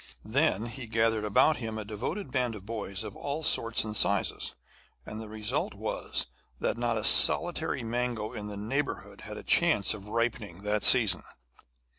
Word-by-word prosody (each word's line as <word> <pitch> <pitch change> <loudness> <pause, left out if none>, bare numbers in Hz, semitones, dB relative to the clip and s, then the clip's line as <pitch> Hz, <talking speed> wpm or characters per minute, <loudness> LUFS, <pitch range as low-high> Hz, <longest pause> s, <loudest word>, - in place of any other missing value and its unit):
Then 115 -2 +1
he 120 +1 -8
gathered 110 -1 +1
about 120 +9 +3
him 110 -3 -5
a 110 - -5
devoted 110 - -5
band 125 -3 -1
of 100 -2 -11
boys 100 -3 -4
of - - -8
all 145 +3 -5
sorts 115 -5 +2
and 110 -1 -6
sizes, - - 0 0.5
and 110 +1 -7
the 110 - -9
result 110 0 -3
was - - -1 0.3
that - - -1
not 120 -1 -1
a 110 - -3
solitary - - +5
mango 120 -1 -3
in 105 -3 -6
the 105 -1 -7
neighbourhood 135 +8 -4
had - - -8
a - - -9
chance 100 -2 +3
of 105 -1 -10
ripening 110 -5 -3
that 105 0 -1
season. 115 -7 +7
110 Hz, 170 wpm, -28 LUFS, 105-120 Hz, 0.5 s, season